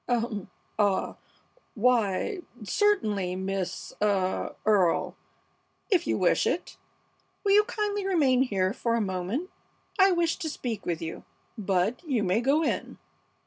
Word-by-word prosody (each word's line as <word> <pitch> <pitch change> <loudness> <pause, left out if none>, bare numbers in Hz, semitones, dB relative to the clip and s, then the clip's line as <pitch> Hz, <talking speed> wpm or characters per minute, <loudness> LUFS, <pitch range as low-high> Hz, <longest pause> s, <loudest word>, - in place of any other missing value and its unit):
"Um! 230 -5 -1 0.3
Ah! 200 -2 +1 0.6
Why, 235 - +1 0.2
certainly, 210 - +1
Miss 190 0 -3
ah 195 -3 0
Earle, 195 -6 +2 0.8
if 355 -3 +3
you - - +1
wish - - +2
it. - - -2 0.7
Will 400 - +2
you 415 +1 +7
kindly 415 -3 -2
remain 280 -9 +3
here 195 -7 +1
for 230 -1 0
a - - +1
moment? 200 - -2 0.5
I 385 0 +7
wish 340 -2 +1
to 330 -4 -3
speak 230 -8 -5
with 170 -2 -2
you. 165 - -6 0.3
Bud, 200 +1 0
you 260 -10 0
may 195 +4 +2
go 285 +6 +2
on." - - -3
230 Hz, 135 wpm, -27 LUFS, -, 0.8 s, you